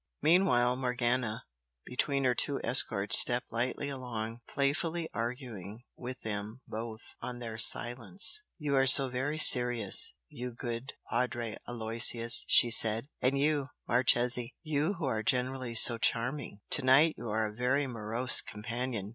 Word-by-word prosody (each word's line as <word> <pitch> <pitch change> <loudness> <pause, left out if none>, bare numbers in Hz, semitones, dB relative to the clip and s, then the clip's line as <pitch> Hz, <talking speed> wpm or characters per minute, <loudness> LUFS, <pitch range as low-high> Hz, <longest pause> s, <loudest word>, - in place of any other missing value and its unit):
Meanwhile, 125 -7 +1
Morgana, 125 -3 -3 0.4
between 135 +2 -3
her 125 -1 +1
two 140 +3 -2
escorts 105 -5 +5
stepped 120 0 +4
lightly 125 +4 -4
along, 120 -4 -7
playfully 160 +4 -3
arguing 115 -3 -8
with 125 0 -9
them 110 +3 -7
both 110 0 -8 0.2
on 125 - -7
their 115 -2 -9
silence. 125 - 0 0.2
"You 145 -3 -3
are 135 0 +1
so 135 +1 +8
very 135 +5 -5
serious, 125 -6 +5
you 125 - -9
good 120 +2 -8 0.2
Padre 120 -2 -3
Aloysius!" 115 0 +1
she 120 - +4
said 115 +3 +1
"And 130 +2 -1
you, 145 -1 -2 0.2
Marchese 120 0 +1
you 155 +3 -2
who 170 -4 -6
are 110 -5 -3
generally 125 +1 -3
so 115 +1 +7
charming! 120 -1 -3
to - - +3
night 140 +5 +3
you 115 - -9
are 110 +1 -2
a 105 - -7
very 130 +5 -2
morose 120 +1 +1
companion! 110 0 -6
125 Hz, 140 wpm, -29 LUFS, 115-135 Hz, 0.4 s, so